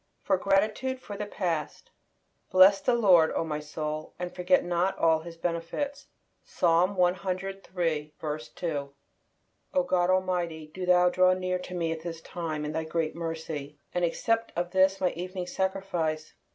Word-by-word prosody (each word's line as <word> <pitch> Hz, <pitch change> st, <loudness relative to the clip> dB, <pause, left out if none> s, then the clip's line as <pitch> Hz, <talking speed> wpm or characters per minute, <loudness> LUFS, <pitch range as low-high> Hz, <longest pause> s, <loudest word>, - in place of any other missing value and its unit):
FOR 195 Hz, -, +3 dB
GRATITUDE 215 Hz, +7 st, +1 dB
FOR 205 Hz, -5 st, -8 dB
THE 210 Hz, +1 st, -4 dB
PAST. 170 Hz, -7 st, -3 dB, 0.6 s
"Bless 190 Hz, +1 st, +7 dB
the 240 Hz, +4 st, +2 dB
Lord, 185 Hz, -8 st, +5 dB
O -, -, +1 dB
my 155 Hz, -2 st, -3 dB
soul, 150 Hz, +1 st, -5 dB
and 180 Hz, 0 st, -5 dB
forget 180 Hz, +10 st, +2 dB
not 175 Hz, +2 st, 0 dB
all 160 Hz, -1 st, +4 dB
His 165 Hz, +1 st, -10 dB
benefits." 175 Hz, -, -3 dB, 0.4 s
Psalm 175 Hz, +3 st, +2 dB
ciii. 175 Hz, -4 st, -2 dB
2. 145 Hz, -5 st, -3 dB, 0.8 s
O 275 Hz, -, +4 dB
God 180 Hz, -8 st, +1 dB
Almighty, 175 Hz, -4 st, 0 dB
do 185 Hz, 0 st, -5 dB
Thou 180 Hz, 0 st, +5 dB
draw 185 Hz, 0 st, +5 dB
near 185 Hz, 0 st, -1 dB
to 180 Hz, 0 st, -7 dB
me 165 Hz, -2 st, -1 dB
at 160 Hz, -1 st, -4 dB
this 165 Hz, -1 st, -6 dB
time 160 Hz, -3 st, -4 dB
in 150 Hz, -, -3 dB
Thy 160 Hz, +1 st, -2 dB
great 160 Hz, 0 st, -2 dB
mercy, 160 Hz, -3 st, -5 dB, 0.2 s
and 180 Hz, -, 0 dB
accept 225 Hz, +6 st, 0 dB
of 175 Hz, 0 st, -2 dB
this 190 Hz, +1 st, +3 dB
my 180 Hz, -1 st, +2 dB
Evening 180 Hz, +1 st, -5 dB
Sacrifice! 180 Hz, -5 st, -2 dB
175 Hz, 155 wpm, -28 LUFS, 160-190 Hz, 0.8 s, Bless